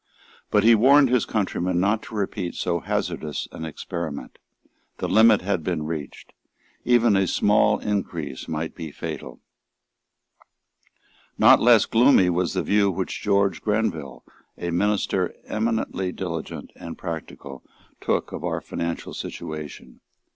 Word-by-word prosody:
But 105 - +3
he 115 +1 +7
warned 135 +5 +6
his 125 -3 +2
countrymen 90 -4 -1
not 105 +4 +1
to - - -10
repeat 100 -3 -3
so 85 -1 -1
hazardous 75 -2 -3
an 80 - -7
experiment. 80 -1 -6 0.6
The - - -3
limit 110 0 +5
had 95 -4 -1
been 80 -3 -2
reached. 75 -3 -6 0.5
Even 120 -3 +4
a 95 -1 +2
small 105 +4 +3
increase 85 -9 -4
might 80 0 -3
be 80 -3 -7
fatal. - - -7 2.0
Not - - +7
less 115 -2 +6
gloomy 115 -6 +4
was 90 +1 -1
the 90 - 0
view 100 -1 +3
which 95 0 -3
George 100 -3 +1
Grenville, 85 - -2 0.3
a 85 - -3
minister 95 0 0
eminently 110 -4 -1
diligent 85 -4 -6
and 85 - -8
practical, 80 -5 -7 0.4
took - - -1
of - - -6
our - - -1
financial 85 0 -5
situation. 75 -2 -7
95 Hz, 130 wpm, -24 LUFS, 85-105 Hz, 2.0 s, he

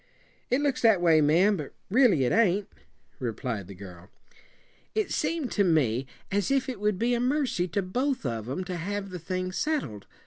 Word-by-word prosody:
"It 255 +3 +2
looks 280 -3 0
that 220 -5 +5
way, 165 -3 +5
ma'am, 175 +8 +4
but 150 -4 -7 0.2
really 220 - +5
it 125 - +1
ain't," 205 -3 +3 0.5
replied 115 -5 -4
the 100 - -10
girl. 90 -1 -12 0.9
"It 435 -1 0
seemed 320 -7 -1
to 205 - +2
me 135 - +2 0.2
as 200 +4 0
if 275 -1 +1
it 255 -5 -5
would 210 -2 0
be 235 +4 +1
a 240 - +1
mercy 250 -8 0
to 195 +3 -1
both 255 - -1
of 115 -2 -3
'em 165 +8 -3
to 180 -1 -5
have 195 +3 -4
the 180 - -6
thing 185 +2 -3
settled. 185 - -2
185 Hz, 185 wpm, -27 LUFS, -, 0.9 s, that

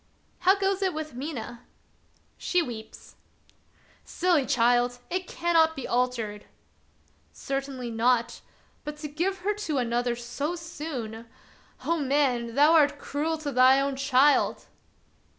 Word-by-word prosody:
" - - -39
How 385 - +7
goes 390 0 0
it 375 -4 0
with 310 -3 -5
Mina 245 -3 -6 0.2
} - - -39
" - - -39
" - - -39
She 360 - +1
weeps." 220 -5 -10 0.4
" - - -35 0.2
Silly 340 -6 +1
child! 245 +1 +2
it 365 0 -2
cannot 330 -2 +2
be 270 - -5
altered! 235 -4 -1 0.3
" - - -38
" - - -37
Certainly 270 -3 -4
not; 235 +1 +1 0.4
but 300 0 -6
to 300 0 -6
give 355 +6 -2
her 415 - +2
to 405 -9 -3
another 240 0 0
so 250 +7 -4
soon. 280 -9 -6 0.6
Oh, 335 0 +1
man! 260 -5 0
thou 295 +3 +6
art 295 -3 +4
cruel 310 +3 -2
to 285 - -1
thy 260 +1 +6
own 275 0 -1
child." 275 +1 +3
275 Hz, 150 wpm, -27 LUFS, 245-320 Hz, 0.6 s, How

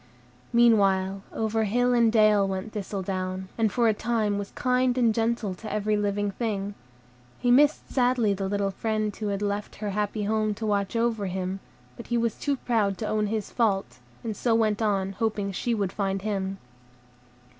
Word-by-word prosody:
Meanwhile, 195 -5 +3
over 220 0 0
hill 245 +4 +2
and 235 -2 +4
dale 215 -3 +4
went 190 +2 -4
Thistledown, 190 -2 -4
and 220 -2 +1
for 240 -2 +2
a 220 - +4
time 215 -2 0
was 200 - -5
kind 250 0 +1
and 235 -3 +3
gentle 225 -3 0
to 215 +4 -8
every 210 0 0
living 205 0 0
thing. 205 -2 -3 0.6
He 245 - +1
missed 290 +4 +4
sadly 245 -5 +3
the 195 0 -3
little 200 -1 0
friend 215 0 -2
who 215 - -4
had 200 0 -2
left 205 0 -3
her 205 -1 -4
happy 210 +1 -1
home 215 0 0
to 220 - -5
watch 200 0 0
over 230 -3 0
him, 185 +1 -3 0.4
but 235 - -9
he 240 - 0
was 230 -2 +1
too 285 -1 -1
proud 215 -7 0
to 215 - -3
own 215 0 0
his 215 -1 -3
fault, 200 - 0 0.2
and 220 -2 -3
so 230 +1 +1
went 220 -1 +1
on, 195 -3 +1
hoping 205 0 -1
she 235 +5 -1
would 200 -3 -1
find 195 -1 -2
him. 195 -2 -2
210 Hz, 180 wpm, -26 LUFS, 200-230 Hz, 0.6 s, and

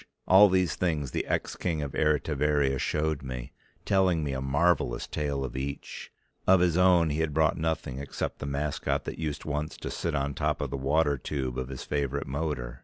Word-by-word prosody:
All 100 +2 +8
these 90 -3 +2
things 75 -7 -1
the - - -2
ex - - -1
King 80 -4 -2
of 70 - -4
Eritivaria 75 -2 +1
showed 75 +1 0
me, 65 -2 -6 0.3
telling 95 -5 +3
me 70 -2 -2
a 65 - -3
marvelous 70 -2 +1
tale 70 -2 -2
of 65 - -7
each; 70 +2 -5 0.4
of 95 0 +7
his 90 -2 +3
own 90 -3 +5
he 75 - -1
had 80 -3 -1
brought 80 0 +3
nothing, 80 -5 -2
except 70 0 -4
the 70 - -4
mascot 70 +1 -1
that - - -6
used 75 -3 -3
once 75 0 -3
to - - -5
sit 85 -2 -2
on 70 0 0
the - - -9
top 75 -2 0
of 70 -3 -3
the - - -2
water 70 +1 +1
tube 65 -2 -3
of 65 0 -4
his 65 -2 -6
favorite 70 -1 -2
motor. 65 -4 -3
75 Hz, 200 wpm, -28 LUFS, 70-80 Hz, 0.4 s, All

